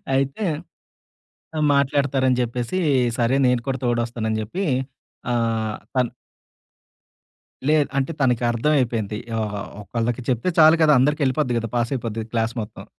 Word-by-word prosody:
అయితే 135 +9 0 1.3
మాట్లాడతారని 140 -2 +2
జెప్పేసి 120 +8 -2 0.4
సరే 120 +3 +2
నేను 125 -1 +2
కూడా 130 - 0
తోడొస్తాను 120 -1 -1
అని 110 - 0
జెప్పి 175 - -3 0.7
ఆహ్, 115 -2 0 0.2
తన్ 125 -2 +2 1.6
లేదు. 155 -2 +4
అంటే 135 +5 -1
తనకర్థమైపోయింది. 120 -3 +1 0.2
ఓహో! 105 -1 -3 0.2
ఒకళ్ళకి 115 +3 -2
చెప్తే 130 +8 +1
చాలు 160 +1 +7
గదా! 155 -1 +6
అందరికెళ్ళిపోద్ది 135 -2 +1
గదా! 115 -1 -4
పాసయిపోద్ది 115 -2 -2
క్లాస్ 115 -1 0
మొత్తం. 105 - -10
120 Hz, 110 wpm, -22 LUFS, 115-140 Hz, 1.6 s, చాలు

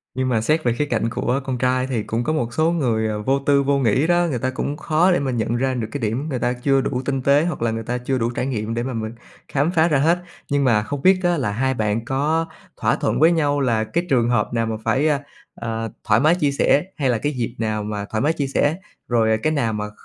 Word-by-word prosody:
Nhưng 130 0 0
mà 115 -3 +1
xét 155 +8 +1
về 120 - +2
khía 145 +5 -1
cạnh 115 -4 -1
của 125 +3 -1
con 130 -1 -3
trai 130 +1 +1
thì 120 -5 -2
cũng 115 +3 -2
có 155 - -1
một 120 -6 -2
số 160 +1 +2
người, 120 -9 0
ờ, 105 -1 -3
vô 135 +6 +1
tư, 140 0 +2
vô 140 0 +2
nghĩ 130 +4 +2
đó 175 0 +3
người 130 -5 -2
ta 130 +2 -1
cũng 140 +3 -3
khó 165 +5 +2
để 175 - +2
mà 135 -2 -1
nhận 115 -1 -1
ra 130 +2 0
được 115 -4 -3
cái 145 - -4
điểm 120 +8 -2
người 130 -4 -2
ta 120 +1 0
chưa 135 +2 +1
đủ 125 -1 -2
tinh 135 -1 -1
tế 140 +3 +4
hoặc 175 -8 -3
là 115 -1 +1
người 115 0 -4
ta 120 +2 -2
chưa 125 +2 -2
đủ 115 -1 0
trải 125 +1 -3
nghiệm 115 -4 -3
để 120 +1 -2
mà 130 +1 -4
mình 110 -1 -3 0.4
khám 145 +4 0
phá 165 -2 +3
ra 150 - +2
hết. 165 +5 +3 0.3
Nhưng 145 0 +1
mà 115 -5 +3
không 135 +6 -5
biết 185 +3 +5
á 175 -1 +2
là 120 -7 -1
hai 130 +5 0
bạn 110 -1 -1
có 150 +6 0 0.3
thỏa - - +1
thuận - - -1
với 160 +3 +6
nhau 145 -3 +1
là 115 -4 +1
cái 170 +10 -2
trường 120 -4 +2
hợp 120 -2 0
nào 115 -1 +1
mà 110 0 -2
phải, 130 +7 +2 0.5
ờ, 115 -1 -4
thoải 110 -1 +3
mái 155 +6 +4
chia 150 -6 +1
sẻ 140 +1 +3
hay 140 -4 +1
là 120 - +2
cái 145 +7 -1
dịp 120 -2 -3
nào 110 -1 -2
mà 105 -1 -4
thoải 110 - -1
mái 155 +3 +2
chia 140 -3 -2
sẻ, 145 +3 +1 0.3
rồi, 115 -2 +2
à, 110 - +3
cái 155 - +2
nào 120 -7 0
mà 105 0 -3
kh - - -16
130 Hz, 280 wpm, -21 LUFS, 115-145 Hz, 0.5 s, với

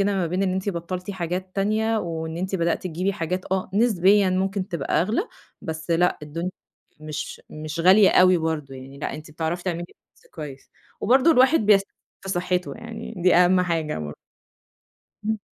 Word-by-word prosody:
ما 195 -3 +1
بين 180 +4 -1
إن 185 -1 +1
أنتِ 190 +2 -2
بطّلتِ 180 +2 -4
حاجات 185 +1 -4
تانية 220 +3 +1
وإن 160 -2 -4
أنتِ 190 +2 -3
بدأتِ 170 -2 0
تجيبي 185 +3 -1
حاجات 180 0 -3
آه 190 -1 -1
نسبيًا 200 -3 +4
ممكن 190 +1 -1
تبقى 165 -6 0
أغلى 220 - 0 0.4
بس 160 +1 -6
لأ 175 +2 +2
الدني 165 +4 -4 0.5
مش 155 -1 -6
مش 155 +1 -5
غالية 190 +3 +7
أوي 185 0 +6
برضه 155 -4 -3
يعني 135 +1 -11
لأ - - -4
أنتِ 155 0 -9
بتعرفي 165 +3 -3
تعملي 175 -2 -2
balance - - -30
كويس 145 -4 -9 0.3
وبرضه 260 +8 +4
الواحد 265 +2 +5
بيس 205 -2 +5 0.4
في 195 - -9
صحته 180 0 -1
يعني 230 0 -8
دي 180 +1 +3
أهم 180 +1 +5
حاجة 165 - -1
بر 75 -1 -6 1.1
إمم. 220 0 0
180 Hz, 165 wpm, -24 LUFS, 165-195 Hz, 1.1 s, غالية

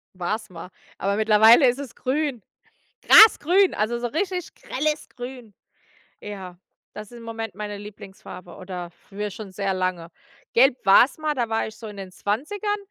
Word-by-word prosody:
War's 210 +4 -4
mal. 180 +1 -10 0.3
Aber 200 +1 -1
mittlerweile 220 +5 +6
ist 245 +3 0
es 270 -4 -8
grün. 270 -4 -2 0.6
Grasgrün, 390 -3 +6
also 230 +3 -1
so 240 0 -3
richtig 360 - -3
grelles 300 +2 -3
Grün. 245 -4 -10 0.7
Ja, 185 -4 -9 0.3
das 210 +2 -10
ist 240 - -11
im 230 - -12
Moment 225 -2 -6
meine 205 -1 -6
Lieblingsfarbe, 195 -3 -11
oder 180 -2 -8
für 205 +4 -7
schon 200 -1 -9
sehr 195 0 -2
lange. 185 -2 -3 0.4
Gelb 260 +1 +4
war’s 235 +9 +5
mal, 310 -1 -1
da 240 -4 -2
war 225 - 0
ich 220 - -11
so 225 - -10
in 210 - -10
den 190 -2 -8
20ern, 380 - -3
220 Hz, 165 wpm, -23 LUFS, 195-260 Hz, 0.7 s, mittlerweile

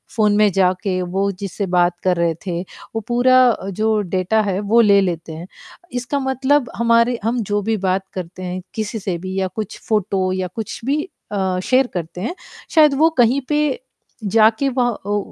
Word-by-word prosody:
Phone 210 -2 +3
में 210 -1 +5
जाके 185 0 +1
वो 190 +3 -1
जिससे 200 0 -3
बात 175 0 +2
कर 180 -2 +2
रहे 170 -1 +1
थे, 175 -1 -2 0.3
वो 225 - -1
पूरा 255 +1 +5
अ, 195 -3 -2
जो 215 +2 0 0.2
डेटा 215 +4 +2
है 195 -2 -1
वो 235 - +7
ले 200 -2 +5
लेते 165 -3 -3
हैं। 170 +3 -8 0.5
इसका 245 +4 -2
मतलब 265 0 +1
हमारे 235 +1 +2
हम 235 +2 0
जो 205 0 0
भी 220 +1 -1
बात 190 +1 0
करते 185 0 -7
हैं, 180 +1 -4
किसी 220 0 -3
से 185 -3 -3
भी 185 +2 -6
या 190 - 0
कुछ 215 -3 -5
फ़ोटो 195 -3 0
या 185 -1 -2
कुछ 220 -3 -5
भी 295 +3 0 0.3
अ, 190 -2 -1
शेयर 260 0 +3
करते 175 0 -5
हैं, 345 - -3 0.3
शायद 305 -3 +5
वो 320 +2 +5
कहीं 245 +3 +4
पे, 295 -3 +1 0.4
जाके 220 +5 +3
वह 245 -1 +3 0.2
ओ 205 0 0
205 Hz, 190 wpm, -19 LUFS, 185-240 Hz, 0.5 s, वो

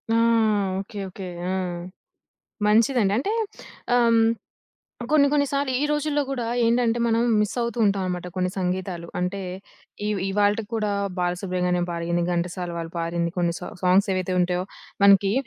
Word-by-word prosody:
ఆ! - - +4 0.6
Okay. 205 +1 -7
Okay. 190 +1 -8 0.2
ఆ! - - 0 1.2
మంచిదండి. 220 -1 +3
అంటే 395 +10 -1 0.6
ఆహ్, 245 -1 +4
హ్మ్, 225 0 +5 0.8
కొన్ని, 285 -2 +5
కొన్ని 290 -1 +3
సార్లు 280 -1 0
ఈ - - +2
రోజుల్లో 295 0 0
గూడా 250 -4 -2 0.2
ఏంటంటే, 235 0 +2
మనం 230 0 +2 0.2
మిస్సవుతూ 235 +2 -2
ఉంటాం 200 -1 +1
అన్నమాట 180 -1 -3
కొన్ని 180 0 0
సంగీతాలు. 180 -2 -2
అంటే, 185 +2 -2 0.7
ఇవ్ 210 -2 0
ఇవాల్టికి 205 +2 +1
కూడా 210 -2 0 0.3
బాలసుబ్రహ్మణ్యం 180 0 0
పాడింది, 170 0 -1
ఘంటసాల 175 +1 -2
వాళ్ళు 165 0 -5
పారింది 170 0 -1
కొన్ని 170 -1 +1
సా 180 - -6 0.2
సాంగ్స్ 185 +3 +4
ఏవైతే 185 0 -1
ఉంటాయో, 180 0 +1 0.4
మనకి 200 0 +6
195 Hz, 140 wpm, -24 LUFS, 180-230 Hz, 1.2 s, మనకి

